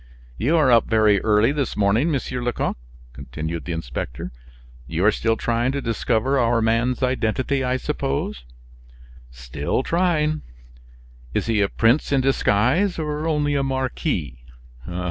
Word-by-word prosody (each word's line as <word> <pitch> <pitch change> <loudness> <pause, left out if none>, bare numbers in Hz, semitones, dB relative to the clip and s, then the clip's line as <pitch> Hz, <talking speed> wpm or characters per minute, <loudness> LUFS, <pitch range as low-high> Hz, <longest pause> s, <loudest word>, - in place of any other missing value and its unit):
"You 145 - +1
are 145 -5 +4
up 115 -2 +5
very 110 -3 +4
early 110 +3 +3
this 145 -2 -2
morning, 105 +9 +2
Monsieur 130 -4 -2
Lecoq," 120 -1 -1 0.4
continued 75 +5 -6
the 90 - -4
inspector; 65 -6 -5 0.6
"you 85 +5 -1
are 110 - +6
still 115 +1 0
trying 120 +3 0
to 140 - -1
discover 120 +2 0
our 120 -1 +2
man's 115 +3 +1
identity, 130 +2 0
I 130 0 0
suppose?" 70 - -3 0.9
"Still 65 - -3
trying." 155 -3 +1 0.9
"Is - - 0
he 110 -2 +1
a 100 - +2
prince 115 +7 +2
in 140 - +3
disguise, 135 - +2
or 150 0 -3
only 150 -2 +1
a 140 - +1
marquis?" 130 - -2
120 Hz, 140 wpm, -22 LUFS, 100-140 Hz, 0.9 s, are